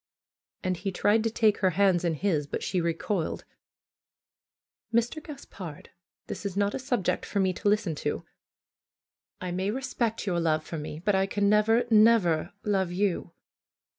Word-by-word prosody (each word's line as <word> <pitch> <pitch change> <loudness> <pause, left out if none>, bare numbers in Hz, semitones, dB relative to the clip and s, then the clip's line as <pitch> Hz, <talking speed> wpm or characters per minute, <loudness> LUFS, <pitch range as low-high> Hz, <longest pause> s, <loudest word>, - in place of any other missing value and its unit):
And 185 -2 0
he 195 +3 -3
tried 210 +4 +2
to - - +3
take 220 -2 +2
her 190 - +3
hands 190 -3 +4
in 170 -2 +1
his, 155 -4 0
but - - -4
she 180 - 0
recoiled. 170 +2 -2 1.5
"Mr. 235 +7 +1
Gaspard, 195 - -9 0.3
this - - -6
is 200 -2 -4
not 200 0 +1
a - - -3
subject 245 -7 -1
for 200 - -2
me 190 -1 +2
to 205 - 0
listen 205 -5 +1
FAITH 150 - -8
to. - - -2 1.2
I 180 -1 -3
may 185 +3 -1
respect 235 -2 -2
your 175 -4 0
love 155 -2 +1
for 160 0 -6
me; 150 0 -6
but 205 - +3
I 190 0 +2
can 200 0 +1
never, 215 +3 +4
never 210 -7 +4
love 190 -4 0
you. 180 -2 -1
195 Hz, 165 wpm, -28 LUFS, 175-215 Hz, 1.5 s, hands